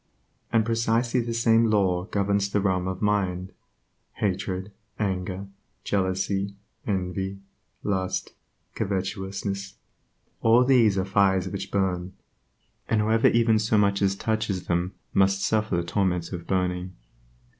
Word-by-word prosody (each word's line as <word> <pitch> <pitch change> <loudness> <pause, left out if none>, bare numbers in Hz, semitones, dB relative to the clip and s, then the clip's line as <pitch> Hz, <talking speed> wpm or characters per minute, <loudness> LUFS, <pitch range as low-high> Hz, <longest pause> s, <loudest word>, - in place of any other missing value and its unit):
And 115 -1 +3
precisely 115 +2 +1
the 120 -1 -2
same 115 0 +3
law 95 -4 +2
governs 100 -1 0
the 100 - +1
realm 95 -2 0
of 95 +2 -4
mind. 95 -3 0 0.6
Hatred, 95 0 -2 0.3
anger, 95 -1 -2 0.4
jealousy, 95 +1 -1 0.3
envy, 95 0 -2 0.5
lust, 95 -2 -2 0.4
covetousness, 100 0 -3 0.7
all 115 +2 +5
these 120 -6 +4
are 95 - +1
fires 95 -1 +2
which 100 - -5
bum, 95 -2 -1 0.8
and 110 - +2
whoever 110 +2 +3
even 115 -1 +4
so 110 0 +2
much 100 -1 +2
as 100 -1 +2
touches 105 -4 -2
them 90 +2 -1 0.2
must 95 0 +3
suffer 110 -4 +1
the 85 - 0
torments 90 -1 -1
of 85 -2 -6
burning. 90 -1 -1
100 Hz, 125 wpm, -26 LUFS, 95-105 Hz, 0.8 s, all